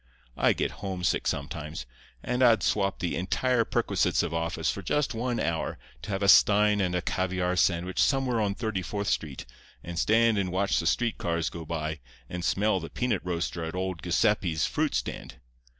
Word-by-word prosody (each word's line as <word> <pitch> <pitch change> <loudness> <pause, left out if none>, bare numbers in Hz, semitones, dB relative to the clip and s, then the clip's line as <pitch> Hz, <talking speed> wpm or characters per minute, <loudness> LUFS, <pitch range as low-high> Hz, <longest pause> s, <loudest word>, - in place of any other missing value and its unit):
I - - +3
get - - -1
homesick 95 -3 -1
sometimes, 75 -2 -4 0.4
and 125 +1 -1
I'd 120 -3 +5
swap 100 -2 +1
the 85 - -2
entire 115 +7 +1
perquisites - - +1
of - - -3
office 80 0 -1
for 100 - -6
just 140 +8 0
one 120 +1 -2
hour 80 -1 -2 0.2
to - - -8
have 100 0 -1
a - - +2
stein 105 +1 +6
and 90 -2 0
a 90 - -1
caviare 90 -1 -1
sandwich 90 0 +1
somewhere 130 -5 +2
on 100 -2 0
Thirty 110 -4 -2
fourth 100 +2 -3
Street, 75 -4 -2 0.4
and 85 -1 -5
stand 115 +1 +3
and 95 -2 -1
watch 95 +2 +1
the 85 - -1
street 115 +5 0
cars 85 -2 -1
go 85 -1 -7
by, 80 -1 -3 0.3
and 90 +4 -5
smell 100 +1 +1
the 80 -1 -7
peanut 125 -6 -1
roaster 85 -1 -3
at 80 +2 -5
old 95 -3 -3
Giuseppe's 90 -2 +1
fruit - - -1
stand. - - -4
95 Hz, 180 wpm, -28 LUFS, 85-105 Hz, 0.4 s, stein